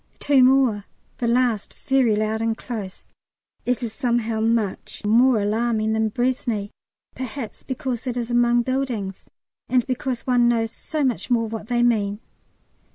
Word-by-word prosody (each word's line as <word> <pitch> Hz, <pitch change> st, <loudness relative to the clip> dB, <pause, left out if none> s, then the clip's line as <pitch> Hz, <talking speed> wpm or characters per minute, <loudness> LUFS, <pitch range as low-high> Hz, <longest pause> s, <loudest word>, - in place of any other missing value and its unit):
Two 280 Hz, -3 st, +4 dB
more 255 Hz, -6 st, +3 dB, 0.3 s
the 235 Hz, -, 0 dB
last 235 Hz, -3 st, +1 dB
very 260 Hz, -5 st, +2 dB
loud 215 Hz, +1 st, -1 dB
and 225 Hz, 0 st, 0 dB
close. 205 Hz, -6 st, -7 dB, 0.6 s
It 250 Hz, 0 st, 0 dB
is 225 Hz, -2 st, -4 dB
somehow 235 Hz, -3 st, 0 dB
much 220 Hz, -3 st, -1 dB
more 235 Hz, +2 st, +5 dB
alarming 220 Hz, +1 st, 0 dB
than 220 Hz, 0 st, +1 dB
Braisne, 240 Hz, -3 st, -1 dB, 0.4 s
perhaps 255 Hz, -2 st, -6 dB
because 260 Hz, -2 st, -4 dB
it 250 Hz, -1 st, -2 dB
is 240 Hz, 0 st, -3 dB
among 240 Hz, 0 st, +3 dB
buildings, 240 Hz, -7 st, -3 dB, 0.4 s
and 250 Hz, -2 st, +2 dB
because 255 Hz, -1 st, -3 dB
one 245 Hz, -2 st, +3 dB
knows 225 Hz, -1 st, +1 dB
so 305 Hz, +5 st, -4 dB
much 255 Hz, -2 st, -1 dB
more 230 Hz, -2 st, +2 dB
what 220 Hz, -1 st, -6 dB
they 240 Hz, 0 st, +1 dB
mean. 205 Hz, -4 st, +1 dB
235 Hz, 150 wpm, -23 LUFS, 220-250 Hz, 0.6 s, more